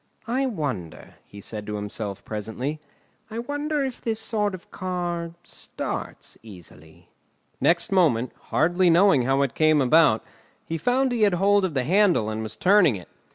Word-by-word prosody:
"I 260 +3 0
wonder," 135 - -5
he 100 - -12
said 105 +1 -7
to 105 - -3
himself 105 -1 -5
presently, 110 +8 -4 0.5
"I 220 - -7
wonder 290 +3 -2
if 260 -2 -6
this 225 -2 -2
sort 210 -3 -1
of 185 - -15
car 175 -2 -4
starts - - -7
easily?" 85 -7 -14 0.5
Next 170 +2 +2
moment, 140 -11 +2
hardly 175 +4 +2
knowing 170 -7 +4
how 135 +2 +2
it 135 - -2
came 155 -1 +3
about, 140 -3 +4 0.4
he 165 0 -4
found 255 - +1
he 240 -2 -1
had 205 -4 +4
hold 200 +2 +3
of 180 -6 -2
the 130 - +1
handle 175 - +2
and 110 0 -4
was 110 -1 -5
turning 185 - +4
it. 90 - -10
165 Hz, 160 wpm, -24 LUFS, -, 0.5 s, knowing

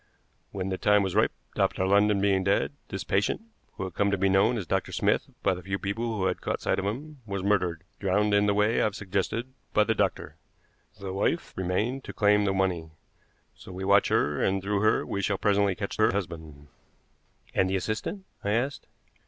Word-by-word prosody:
When 95 -1 -3
the 95 - -3
time 105 0 +4
was 95 -2 -2
ripe, 110 +2 +3 0.2
Dr. 95 - +1
London 100 +1 +4
being 95 -1 +2
dead, 95 +1 +1 0.2
this 95 - -5
patient, 100 +2 +1 0.3
who - - -5
had 95 -2 -5
come 100 +3 +1
to 100 - +1
be 95 +1 +2
known 100 +5 +3
as 100 - -3
Dr. - - -1
Smith - - +1
by - - +3
the 90 - -6
few 95 +2 -3
people 110 +3 -3
who 95 - 0
had - - -1
caught - - -2
sight - - 0
of 95 - -3
him, 140 +7 -5
was 100 -1 -3
murdered, 90 -5 +1 0.2
drowned, 105 +2 +1
in 100 0 +4
the 100 - +2
way 105 +3 +2
I - - +3
have 105 -2 -1
suggested, 105 +5 -2 0.2
by 105 - +6
the 115 - +1
doctor. - - -1 0.6
The 95 -1 -5
wife 100 - -1
remained 105 +9 -1
to - - -7
claim 105 0 +3
the 100 - +2
money. 90 -4 0 0.6
So - - -13
we 95 +1 -5
watch 100 +1 +5
her, 75 0 +1
and 95 0 +2
through 100 +1 -1
her 110 - +3
we 100 - -2
shall 100 0 0
presently 100 -1 +2
catch 100 +1 -5
her 110 - +4
husband." 80 -7 -6 0.8
"And 95 - +2
the 95 - 0
assistant?" 110 - -3 0.2
I 100 - 0
asked. 130 +5 -1
100 Hz, 210 wpm, -27 LUFS, 95-105 Hz, 0.8 s, by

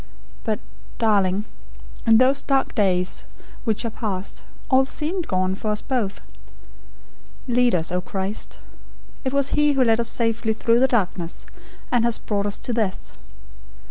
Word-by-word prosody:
But, 215 -2 0 0.4
darling, 205 -3 +2 0.6
in 225 -1 +7
those 260 +3 +4
dark 270 -1 +1
days 185 -4 +1 0.4
which 225 0 0
are 230 - -2
past, 200 -4 -4 0.3
all 265 0 +5
seemed 315 +6 -2
gone, 185 0 +1
for 195 - -5
us 210 0 -1
both. 240 -8 -2 1.3
'Lead 245 -3 +3
us, 165 -1 0
O 180 0 0
Christ' 190 +3 -3 0.7
It 260 - -1
was 280 0 +3
He 295 0 +3
who 270 -2 +3
led 225 -1 +3
us 235 - +2
safely 225 -1 0
through 230 +1 +2
the 265 - +5
darkness, 185 -8 -1 0.5
and 245 -2 +3
has 235 -1 +2
brought 205 -1 -1
us 205 - 0
to 245 - -2
this. 215 -5 -2
225 Hz, 150 wpm, -23 LUFS, 195-255 Hz, 1.3 s, in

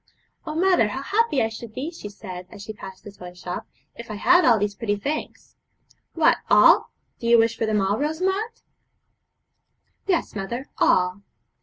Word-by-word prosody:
'Oh, 305 - -4
mother, 360 - +3
how 265 +6 -5
happy 415 - +1
I 220 - 0
should 225 0 -10
be,' 290 +6 -4
she 270 -11 -9
said, 185 -3 -9
as 200 - -11
she 215 - -7
passed 190 -2 -11
a 205 - -8
toy 180 -2 -11
shop, 180 0 -6 0.3
'if 235 -1 -10
I 215 - -4
had 355 - +4
all 235 -3 +5
these 205 0 -1
pretty 205 0 -2
things!' 285 +10 -5 0.6
'What, - - +4
all! - - +6 0.3
Do 235 - -4
you 235 0 +6
wish 230 0 +3
for 225 - -2
them 215 -2 +1
all, 200 +3 0
Rosamond?' 380 +10 -2 1.4
'Yes, 355 -4 0
mother, 235 +6 -4
all.' 180 +2 +2
225 Hz, 175 wpm, -23 LUFS, 200-305 Hz, 1.4 s, all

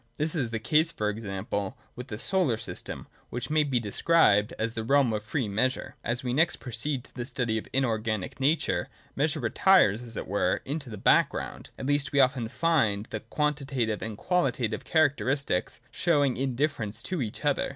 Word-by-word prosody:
This 155 +1 0
is 140 -9 -1
the 115 - -2
case, 155 +9 +2
for 105 -10 -1
example, 100 +1 -4 0.2
with 125 +1 -7
the 105 - -5
solar 155 - +1
system, 110 - -5 0.2
which 125 +5 -5
may 155 0 +4
be 135 -4 +1
described 105 -1 +3
as 115 +1 -2
the 115 - -3
realm 135 -1 +3
of 105 - -1
free 115 +3 -2
measures. 125 +6 -1
As 120 +2 -2
we 125 -1 -1
next 160 +5 +3
proceed 125 +3 -3
to - - -15
the 125 - -4
study 120 -4 -1
of - - -11
inorganic 110 -6 -1
nature, 145 +4 +1 0.3
measure 155 +3 0
retires, 120 - +4
as 115 -2 -7
it - - -3
were, 95 -1 +1
into 145 -1 -4
the 105 - -7
background; - - +1
at - - -6
least 145 0 +1
we 140 - +3
often 130 -3 +3
find 115 -8 +1
the 110 - -3
quantitative 135 -3 -1
and 110 -2 -5
qualitative 130 - 0
characteristics 140 - +1
showing 145 -5 +2
indifference 130 -4 -1
to 180 +2 -2
each 115 +5 -5
other. 145 -1 +1
125 Hz, 180 wpm, -28 LUFS, 110-145 Hz, 0.3 s, may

